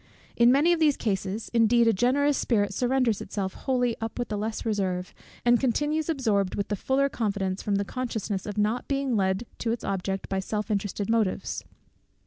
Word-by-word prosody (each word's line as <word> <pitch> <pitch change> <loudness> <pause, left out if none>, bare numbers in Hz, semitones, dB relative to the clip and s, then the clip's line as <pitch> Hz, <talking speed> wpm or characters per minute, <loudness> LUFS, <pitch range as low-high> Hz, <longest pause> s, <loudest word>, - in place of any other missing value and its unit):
In 240 +1 +6
many 295 +6 +4
of 340 - 0
these 300 -3 +3
cases 200 0 -2
indeed 235 0 +4
a 225 - +5
generous 275 +7 +2
spirit 205 -6 +1
surrenders 245 -3 +1
itself 190 -2 -3
wholly 250 -3 0
up 225 0 -4
with 245 -1 -3
the 210 - -2
less 215 +3 -3
reserve, 185 -4 -1 0.3
and 240 -1 +5
continues 295 +5 0
absorbed 215 - +1
with 200 - -2
the 205 - 0
fuller 265 +7 +1
confidence, 200 -6 -2
from 205 - 0
the 200 0 0
consciousness 220 -5 -3
of 205 0 -5
not 215 +4 0
being 275 -3 0
led 190 +2 +1
to 230 - -1
its 235 - -3
object 195 0 -2
by 195 - -1
self 210 +3 -3
interested 205 0 -2
motives. 225 -4 0
225 Hz, 185 wpm, -27 LUFS, 200-250 Hz, 0.3 s, In